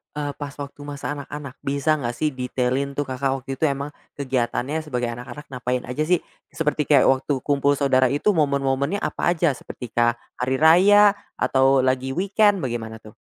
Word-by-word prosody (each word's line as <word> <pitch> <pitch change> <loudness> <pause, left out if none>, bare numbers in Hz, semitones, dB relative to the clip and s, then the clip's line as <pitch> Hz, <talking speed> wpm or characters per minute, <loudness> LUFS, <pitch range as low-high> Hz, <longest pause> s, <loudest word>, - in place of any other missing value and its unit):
eee, 145 -1 -2
pas 145 -1 -6
waktu 140 0 -8
masa 145 0 -5
anak-anak 145 -1 -7
bisa 140 +3 0
enggak 120 -3 -3
sih 155 +4 0
detailin 130 +1 -2
tuh, 145 - 0
Kakak, 135 0 -1
waktu 135 0 -6
itu 160 - +3
emang 140 +1 -3 0.2
kegiatannya 135 +2 -1
sebagai 125 -6 -3
anak-anak 125 +5 -8
ngapain 125 0 -2
aja 140 +5 -3
sih? 180 0 +2 0.2
Seperti 150 -1 -1
kayak 140 -3 +5
waktu 135 0 -1
kumpul 145 0 +2
saudara 130 -2 +3
itu 145 +11 +1
momen-momennya 140 +1 0
apa - - -1
aja 165 -2 +2
seperti 125 -2 -9
kah, 120 0 +2 0.2
hari 130 +2 0
Raya 190 +8 +6 0.2
atau 135 0 +3
lagi 130 +1 0
weekend 200 0 +2
bagaimana 115 -3 -4
tuh? 110 - -12
140 Hz, 170 wpm, -23 LUFS, 130-150 Hz, 0.2 s, Raya